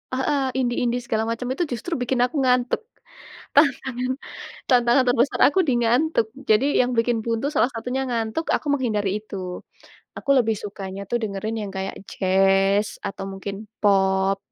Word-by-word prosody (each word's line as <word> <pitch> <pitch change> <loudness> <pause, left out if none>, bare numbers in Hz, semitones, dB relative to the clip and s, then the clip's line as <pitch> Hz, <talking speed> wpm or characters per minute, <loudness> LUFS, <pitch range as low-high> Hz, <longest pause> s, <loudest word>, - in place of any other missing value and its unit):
heeh, 265 -1 0
indie 245 -2 0
indie 245 0 0
segala 225 -2 -1
macam, 240 +2 -3
itu 335 +4 -1
justru 255 +5 -4
bikin 245 0 +1
aku 265 +4 0
ngantuk. 250 - +2 0.8
Tantangan 265 -3 +2 0.6
tantangan 245 0 +4
terbesar 245 +2 +2
aku 335 +7 +1
di 260 - +3
ngantuk. 245 +2 +2 0.2
Jadi, 215 +5 +4 0.2
yang 245 - 0
bikin 230 -1 +1
buntu 230 +4 -1
salah 240 -2 +3
satunya 250 +4 -2
ngantuk, 230 +6 -2
aku 300 - -4
menghindari 210 -6 -1
itu. 185 -4 -6 0.6
Aku - - -4
lebih 225 -3 +2
sukanya 195 -1 -6
tuh 240 - +1
dengerin 215 +2 -3
yang - - -7
kayak 190 0 -4
jazz, 195 +2 +2
atau 195 - -5
mungkin 195 +2 -6 0.2
pop, 195 -1 +3
235 Hz, 155 wpm, -23 LUFS, 200-255 Hz, 0.8 s, tantangan